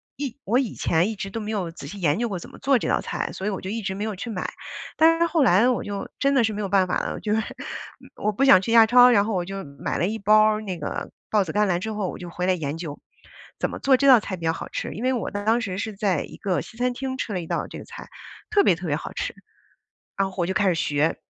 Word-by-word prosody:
一 275 -2 -5
我 230 +5 +2
以 255 -6 -2
前 170 +5 +1
一 220 - -4
直 195 -1 -5
都 225 - -5
没 215 0 -4
有 190 -6 -2
仔 165 - -10
细 200 - -8
研 150 -2 +2
究 240 - 0
过 190 -3 -3
怎 - - -11
么 - - -13
做 275 -1 +3
这 - - -3
道 - - +2
菜， - - -3
所 190 - -6
以 - - +2
我 195 - -4
就 190 - -5
一 225 +3 -3
直 190 -2 -3
没 205 - -4
有 215 -2 -3
去 215 +6 -6
买， 195 -5 -3 0.5
但 330 +1 +5
是 335 - +4
后 330 -2 +2
来 220 +2 +5
我 250 - 0
就 200 -2 -5
真 275 0 +2
的 260 -4 +4
是 220 - +1
没 210 - -4
有 200 - -2
办 190 -1 +3
法 180 - 0
了， - - -3
就 210 - -1
是， 220 - +2 0.7
我 210 - -1
不 235 - 0
想 270 -9 +7
去 210 - -3
亚 230 -1 +8
超， 245 +2 +7
然 205 -4 +5
后 220 - -2
我 180 -2 -1
就 195 +1 -5 0.2
买 - - -2
了 175 - +1
一 220 +2 -2
包 215 +2 +5
儿 215 0 +2
那 190 -4 -5
个 150 - -5 0.2
抱 210 -2 +3
子 160 - -4
甘 210 0 +3
蓝 175 -2 +1
之 220 +3 -4
后 205 -3 -2
我 - - -7
就 180 - -8
我 - - -9
就 - - -19
回 180 +1 -1
来 185 - +4
研 155 -3 -3
究， 160 -4 -6 0.6
怎 - - 0
么 - - -6
做 270 -1 +4
这 275 +2 +2
道 255 -3 +9
菜 200 -2 -5
比 170 - -11
较 160 - +3
好 - - -6
吃。 - - -4
因 220 - -6
为 260 +1 +2
我 240 - -2
当 220 +3 +1
时 190 -5 -3
是 220 0 -4
在 195 -6 0
一 - - -11
个 185 -3 -1
西 225 - -12
餐 250 +1 +1
厅 260 +1 -4
吃 235 - -3
了 185 - -1
一 165 - -8
道 - - -2
这 - - -8
个 - - -10
菜， - - -11 0.4
特 420 -1 +4
别 180 - +4
特 175 +2 -6
别 145 - +1
好 - - -7
吃， - - -3 0.8
然 195 -1 +1
后 190 - -14
我 175 - +2
就 190 - -1
开 200 0 +2
始 180 - +3
学。 150 -1 +1
205 Hz, 335 characters per minute, -24 LUFS, 185-235 Hz, 0.8 s, 道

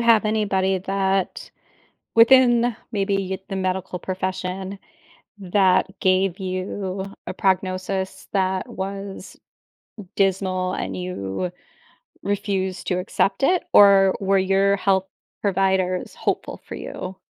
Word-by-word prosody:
have 230 -2 +5
anybody 195 -3 +1
that 195 0 -1 0.6
within 240 -1 +5 0.2
maybe 195 -2 -1
the 195 - -3
medical 185 -1 -2
profession 185 +1 -4 0.6
that 190 -1 +3
gave 185 0 +2
you 190 +1 -4 0.2
a - - -4
prognosis 190 0 -1
that 190 -1 0
was 195 0 -6 0.8
dismal 185 -1 +1
and - - -4
you 180 - -4 0.7
refused 195 -2 -2
to 180 - +1
accept 195 +6 0
it, 360 +5 +3
or 195 -2 +7
were 195 0 +2
your 195 +1 +3
health 190 0 +2 0.4
providers 190 -2 0
hopeful - - -2
for - - -7
you? 185 +1 -6
190 Hz, 105 wpm, -23 LUFS, 185-200 Hz, 0.8 s, or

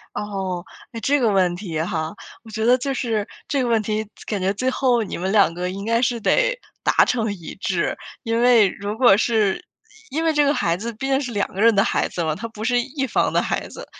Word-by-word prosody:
哦， 195 -4 -3 0.3
诶 230 - -6
这 285 +6 +2
个 235 -4 +3
问 185 -3 +2
题 175 -5 -4
哈。 160 -1 -2 0.3
我 225 - -13
觉 220 +1 -2
得 250 +2 +5
就 275 +2 -2
是 230 -5 -1 0.2
这 280 -2 +1
个 245 - 0
问 230 -2 +2
题， 215 +1 -2 0.2
感 210 - -2
觉 190 +2 +1
最 255 +6 -1
后 250 -3 +2
你 205 - -5
们 185 +2 -2
两 195 -6 +4
个 180 +1 -3
应 195 +2 -6
该 230 +1 +2
是 240 -1 +1
得 - - +2 0.3
达 - - +4
成 225 -4 0
一 175 -5 -9
致。 185 -3 -1 0.3
因 230 0 0
为 240 -5 +6
如 205 +3 -5
果 240 -6 +6
是 215 -4 +1 0.4
因 320 +3 -2
为 325 - +3
这 295 -1 +3
个 285 - +3
孩 170 - 0
子 230 +4 -5
毕 245 +5 -5
竟 270 0 +2
是 250 -4 -4
两 200 -1 +1
个 190 - -7
人 230 -1 +5
的 195 - +4
孩 - - 0
子 175 - -4
了， 160 -2 0
他 210 +9 -5
不 220 -1 -9
是 245 +1 +2
一 275 +2 -3
方 250 - +1
的 - - +3
孩 - - -2
子， - - -10
220 Hz, 260 characters per minute, -22 LUFS, 195-245 Hz, 0.4 s, 为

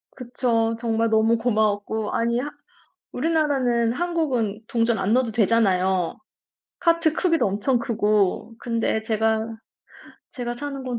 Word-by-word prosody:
그쵸. 235 -2 -1
정말 230 -1 0
너무 220 +1 +3
고마웠고 215 -2 0
아니 235 +1 +1
하 285 - -3 0.6
우리나라는 270 -8 +1
한국은 265 - -1
동전 230 -2 +1
안 200 +3 0
넣어도 250 -2 +2
되잖아요. 190 -5 +2 0.6
카트 335 -2 +2
크기도 330 - +1
엄청 210 +6 0
크고. 215 -2 0
근데 230 -2 -1
제가 220 0 0 0.8
제가 240 -3 -5
사는 280 0 -5
곳은 245 -2 -3
230 Hz, 275 characters per minute, -23 LUFS, 220-255 Hz, 0.8 s, 너무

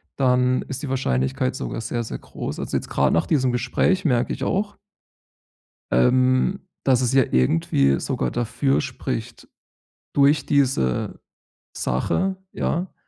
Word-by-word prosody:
dann 125 -1 +2
ist 135 +2 -6
die 140 - -4
Wahrscheinlichkeit 65 - 0
sogar 65 - -4
sehr, 120 +1 -3
sehr 115 - -6
groß. - - -6
Also, - - -4
jetzt - - -6
gerade - - +2
nach 85 - +2
diesem 130 -5 +2
Gespräch 175 +10 +1
merke 125 -5 +1
ich - - -5
auch 205 +1 -1 1.1
ähm, 130 - +3 0.2
dass 130 -2 +4
es 125 0 0
ja 135 -2 +5
irgendwie 70 0 +2
sogar 65 - -2
dafür 135 +4 0
spricht 125 -4 -5 0.6
durch 145 +2 +4
diese 130 - +1 0.6
Sache, 190 - 0 0.2
ja: 175 +3 -2
125 Hz, 135 wpm, -23 LUFS, 110-140 Hz, 1.1 s, ja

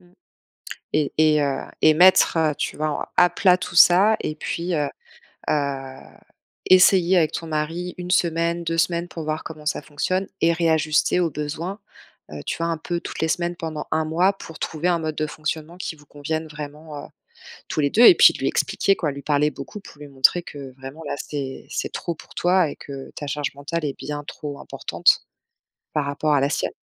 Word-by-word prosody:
Mmh 180 0 -24 0.8
et 150 -2 +1
et 155 -1 +4
heu 140 -2 -1 0.2
et 155 - +6
mettre, 180 -1 +6
heu, 155 -2 +2
tu - - -3
vois, 155 +1 -1
en 150 - -3
à 175 0 +6
plat 180 0 +4
tout 180 - -7
ça 190 +5 +7
et 155 - -3
puis, 170 +3 -3
heu 145 -2 0 0.6
heu, - - +3 1.2
essayer 185 0 +6
avec 160 -3 +2
ton 165 - -4
mari, 165 +3 -3
1 180 0 -5
semaine, 170 -1 +1
2 165 0 -2
semaines 170 +1 +1
pour 165 - -6
voir 155 +1 -3
comment 155 -1 -9
ça 150 - -1
fonctionne 185 +6 -2
et 170 0 +4
réajuster 160 0 +2
aux 170 -2 +1
besoins, 155 +7 -4 0.5
eu, 75 - -7
tu - - -3
vois 165 0 -1
un 165 - -1
peu 170 +2 -3
toutes - - -7
les 160 - +2
semaines, 175 0 -1
pendant 160 -2 -5
1 160 0 +1
mois, 175 +5 +2
pour 165 -4 -11
trouver 165 +2 -2
un 170 -1 +2
mode 155 -1 -3
de 155 - -1
fonctionnement 155 +2 -5
qui 175 -3 -5
vous 150 - -19
convienne 155 +3 -4
vraiment, 150 0 -8
heu, - - -14 0.6
tous 155 - -1
les 145 - +2
deux 235 +10 +5
et 360 - +10
puis - - +7
lui - - -1
expliquer, 195 - +1
quoi, 150 -4 -2
lui 140 0 -8
parler 150 0 +2
beaucoup 210 - -9
pour 150 - -15
lui 145 - -9
montrer 140 +6 +3
que 140 -5 -9
vraiment 135 +4 -9
là, - - -2
c'est 140 -3 -6
c'est - - -3
trop 170 - -4
pour - - -16
toi 180 -2 +3
et - - -7
que 135 -1 -9
ta 145 - -6
charge 145 0 -3
mentale 155 +3 -4
est 140 - -4
bien 145 0 -5
trop 145 -1 -7
importante, - - +1 0.7
par 150 -2 0
rapport 150 +1 0
à 140 - +3
la 140 +1 +1
sienne. - - -1
160 Hz, 210 wpm, -23 LUFS, 150-175 Hz, 1.2 s, et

